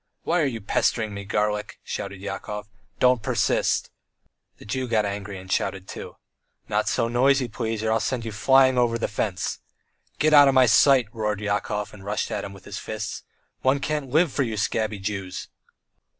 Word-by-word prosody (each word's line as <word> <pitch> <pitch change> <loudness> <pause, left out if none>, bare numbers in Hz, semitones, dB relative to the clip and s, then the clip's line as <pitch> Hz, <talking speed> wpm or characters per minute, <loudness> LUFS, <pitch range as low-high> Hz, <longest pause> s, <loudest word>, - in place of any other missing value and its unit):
"Why 175 +1 +1
are - - +3
you 115 -4 -4
pestering 110 +1 0
me, 100 0 -6
garlic?" 105 0 -1
shouted 100 -1 -5
Yakov. 105 +1 -5 0.3
"Don't 125 -2 +4
persist!" - - +1 0.7
The - - -14
Jew 130 +4 -2
got 110 -3 +2
angry 100 -1 -4
and 95 0 -10
shouted 95 0 -1
too: - - -8 0.5
"Not - - 0
so 115 - +1
noisy, 130 +2 +3
please, 110 -1 -3
or 110 - +1
I'll 115 - +3
send 125 -3 -2
you 110 - -4
flying 130 +4 +4
over 120 -1 +2
the 115 - -1
fence!" 105 -3 -2 0.6
"Get 155 +3 +3
out 145 -1 +9
of 135 - +3
my 130 -1 +7
sight!" 130 0 +5
roared 105 -2 -1
Yakov, 105 0 -2
and 100 -2 -12
rushed 105 +2 -2
at - - -2
him 100 - -6
with 95 -1 -14
his 100 - -6
fists. 110 0 -5 0.4
"One 135 +2 +3
can't 150 -1 -2
live 160 +3 +3
for - - 0
you 115 -5 -1
scabby 110 0 -1
Jews!" 95 -1 -5
110 Hz, 185 wpm, -25 LUFS, 105-130 Hz, 0.7 s, out